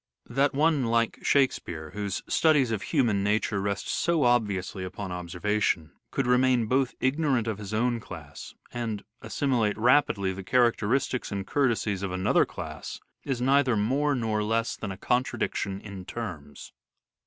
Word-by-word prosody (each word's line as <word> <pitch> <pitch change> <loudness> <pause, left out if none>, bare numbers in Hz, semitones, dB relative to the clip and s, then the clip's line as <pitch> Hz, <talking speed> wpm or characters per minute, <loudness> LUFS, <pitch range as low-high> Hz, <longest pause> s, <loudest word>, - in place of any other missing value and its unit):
That 135 +3 +1
one, 150 -2 +3
like 115 0 +1
Shake 140 -2 +4
speare, 80 -2 -7
whose 100 -2 -3
studies 150 -7 +3
of 110 -3 -1
human 115 -10 +1
nature 105 0 +1
rest 100 0 -2
so 170 -3 +1
obviously 105 -6 +1
upon 95 +1 -6
observation, 90 -1 -1 0.2
could 135 - -1
both 125 - +2
remain 125 0 +3
ignorant 130 -3 +1
of 110 -2 -3
his 100 -1 -7
own 120 +2 +1
class 80 -8 -10 0.2
and 115 -4 -3
also - - -29 0.2
assimilate 120 -7 0
rapidly 110 -5 +3
the 95 +1 -7
characteristics 120 +2 +1
and 100 -1 -3
courtesies 115 -6 0
of 100 -2 -3
another 95 0 +2
class - - -7 0.3
is 130 -3 -2
neither 135 -2 +3
more 140 +7 +1
nor 110 -3 0
less 115 +2 0
than 105 - -5
a 95 - -7
contradiction 100 -4 -1
in 100 -3 -8
terms. 85 -12 -7
115 Hz, 155 wpm, -27 LUFS, 100-130 Hz, 0.3 s, Shake